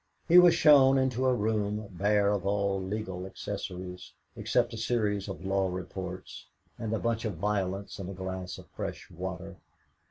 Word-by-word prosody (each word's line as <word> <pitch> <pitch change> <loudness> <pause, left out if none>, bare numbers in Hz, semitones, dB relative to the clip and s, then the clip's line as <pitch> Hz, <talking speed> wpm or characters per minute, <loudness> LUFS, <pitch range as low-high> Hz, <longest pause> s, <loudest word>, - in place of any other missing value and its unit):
He 175 +1 +9
was 175 -1 +7
shown 135 -3 +7
into 130 -1 +1
a 130 - +4
room 105 -1 -1
bare 100 +2 +2
of 100 -3 -1
all 100 -1 0
legal 95 -1 -4
accessories, 90 -2 -6 0.2
except 120 -1 +1
a - - -5
series 105 -3 0
of 95 -1 -7
Law 95 0 +1
Reports 90 0 -6 0.3
and 110 -2 -3
a 110 - +1
bunch 115 0 -1
of 110 -5 -2
violets 100 0 -2
in 95 -1 -5
a - - -5
glass 95 0 -5
of - - -12
fresh - - -6
water. 95 +1 -6
100 Hz, 165 wpm, -29 LUFS, 95-110 Hz, 0.3 s, He